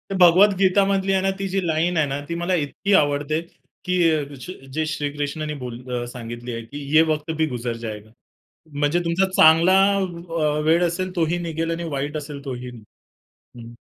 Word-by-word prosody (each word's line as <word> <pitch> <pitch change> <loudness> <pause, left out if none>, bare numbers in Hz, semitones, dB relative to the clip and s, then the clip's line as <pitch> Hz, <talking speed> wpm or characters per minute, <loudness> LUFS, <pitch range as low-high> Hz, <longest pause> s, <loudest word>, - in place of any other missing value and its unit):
भगवद्गीतामधली 195 +1 +4
आहे 190 - +2
ना 195 - +1
ती 195 - -2
जी 195 +1 0
लाईन 165 +2 +1
आहे 150 -2 +2
ना 135 +1 -3
ती 170 - -2
मला 175 +2 -1
इतकी 170 +6 -1
आवडते, 145 0 +2 0.4
की 180 0 0
ए 155 -2 +1
ज 135 +7 -9 0.2
जे 155 +2 0
श्रीकृष्णांनी 150 0 -3
बोल 120 -1 -6
अ, 120 0 -2
सांगितली 120 0 -7
आहे, 115 - -4
की 140 +6 -9 0.2
"ये 160 - +8
वक्त 155 +1 -2
भी 160 - +2
गुजर 120 -3 -4
जाएगा." 110 -2 -7 0.6
म्हणजे 145 +4 +1
तुमचा 170 +3 +2
चांगला 165 +4 +6 0.2
अ, 170 -5 -2
वेळ 165 +3 +4
असेल 185 +2 -4
तोही 170 0 +1
निघेल 165 +1 -2
आणि 165 +1 -3
वाईट 145 +1 -3
असेल 145 -1 -7
तोही. 125 -2 -5 0.9
हं. 120 0 -10
155 Hz, 175 wpm, -22 LUFS, 140-175 Hz, 0.9 s, ये